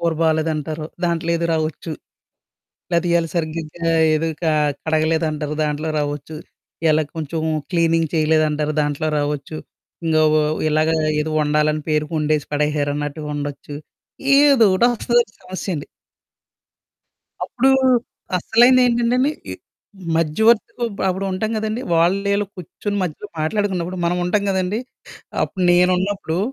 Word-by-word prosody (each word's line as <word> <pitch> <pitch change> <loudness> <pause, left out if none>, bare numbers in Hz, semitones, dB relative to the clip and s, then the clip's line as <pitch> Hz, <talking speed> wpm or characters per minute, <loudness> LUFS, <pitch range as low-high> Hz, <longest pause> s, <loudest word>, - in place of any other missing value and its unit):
కూర 170 -1 +1
బాలేదంటారు. 155 -1 -1 0.2
దాంట్లో 170 -1 0
ఏదో 170 0 -1
రావచ్చు. 160 +1 -3 1.0
లేతే 170 +1 +1
ఇయాల 170 -1 +2
సరిగ్గా 165 -1 -1 0.5
ఏదో 160 +2 0
క 170 - -2 0.4
కడగలేదంటారు. 155 -1 0
దాంట్లో 150 +1 -2
రావొచ్చు. 145 +1 -4 0.5
ఇలా 155 0 +3
కొంచెం 160 +1 -3 0.3
క్లీనింగ్ 165 -1 +2
చేయలేదంటారు. 155 -1 +1
దాంట్లో 145 +1 -1
రావచ్చు. 145 +1 -3 0.5
ఇంగ 160 -1 +2 0.2
వ - - +4 0.3
ఇలాగ 155 +1 +2 0.3
ఏదో 155 +1 -3
వండాలని 150 +1 +1
పేరుకొండేసి 150 -1 0
పడేశారన్నట్టుగా 145 0 -1
ఉండొచ్చు. 145 0 -6 0.6
ఏదో 280 -5 +6
ఒకటి 235 +6 +4
వస్తదండి 235 -2 +1
సమస్య 185 +1 -5
అండి. 145 - -6 1.6
అప్పుడు 265 +1 +2 0.7
అసలైనదేంటంటే 240 +3 +4
అండి, 270 +3 +3 0.2
ఈ - - -3 0.6
మధ్యవర్తికి 220 +10 +2 0.3
అప్పుడు 190 +1 -2
ఉంటాం 215 +4 -2
కదండీ! 220 +3 -3
వాళ్ళు 175 +4 +3
ఈళ్ళు 205 0 0
కూర్చొని 190 +3 -5
మధ్యలో 180 +3 -5
మాట్లాడుకున్నప్పుడు 185 +1 -1
మనం 175 +1 0
ఉంటాం 200 +3 +1
కదండీ, 190 +3 -1 0.6
అప్పుడు 190 - -5
నేనున్నప్పుడు... 180 -1 +1
165 Hz, 115 wpm, -20 LUFS, 155-190 Hz, 1.6 s, ఏదో